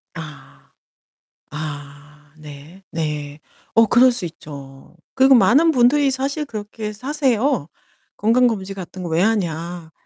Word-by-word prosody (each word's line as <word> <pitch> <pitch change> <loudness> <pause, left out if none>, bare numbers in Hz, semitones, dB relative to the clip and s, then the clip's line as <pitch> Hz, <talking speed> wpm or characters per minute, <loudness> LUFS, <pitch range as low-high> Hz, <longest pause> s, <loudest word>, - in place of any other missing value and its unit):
아. 160 -3 -11 0.8
아. 150 0 -9
네. 155 +5 -13
네. 150 -2 -4 0.3
어 225 - +6
그럴 245 +4 +5
수 240 -7 -5
있죠. 140 -3 -11 0.2
그리고 265 0 +6
많은 255 - +5
분들이 275 +2 +3
사실 275 +3 -2
그렇게 215 -3 -6
사세요. 260 - 0 0.5
'건강검진 220 -3 +1
같은 185 0 -8
거 175 - -4
왜 165 +1 +1
하냐? 175 -5 -2
190 Hz, 215 characters per minute, -20 LUFS, 150-245 Hz, 0.8 s, 어